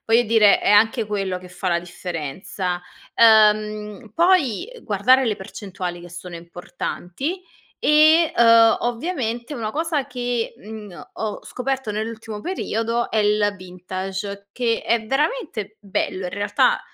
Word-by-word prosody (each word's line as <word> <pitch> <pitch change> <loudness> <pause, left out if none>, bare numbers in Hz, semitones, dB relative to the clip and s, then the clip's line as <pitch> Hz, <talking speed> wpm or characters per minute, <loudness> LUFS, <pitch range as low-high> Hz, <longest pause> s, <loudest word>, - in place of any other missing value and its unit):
voglio 230 +2 +4
dire, 215 -2 +5
è - - +1
anche 220 +2 +4
quello 195 -3 -2
che 180 0 -13
fa 180 +1 -4
la 170 0 +2
differenza. 175 +1 -5 0.3
Uhm, 215 -1 +3
poi 345 - +2
guardare 250 +6 +3
le 215 -3 0
percentuali, 185 -2 -6
che 175 0 -12
sono 180 0 -9
importanti. 175 - -5 0.4
E, 310 +2 +5
uhm, 230 -1 +6
ovviamente, 240 -1 -3
una 220 -3 -4
cosa 310 -3 -1
che, 245 -3 -3
mhmm, 210 -5 -10
ho 215 -2 -4
scoperto 265 -2 -3
nell'ultimo 220 0 -5
periodo 235 - -2
è - - -2
il 210 -1 +2
vintage. 190 +2 -6
Che 235 -2 0
è 230 -1 +1
veramente 270 - -2
bello, 190 -2 -2
in 180 - -5
realtà, 205 - +1
215 Hz, 130 wpm, -22 LUFS, 190-245 Hz, 0.4 s, uhm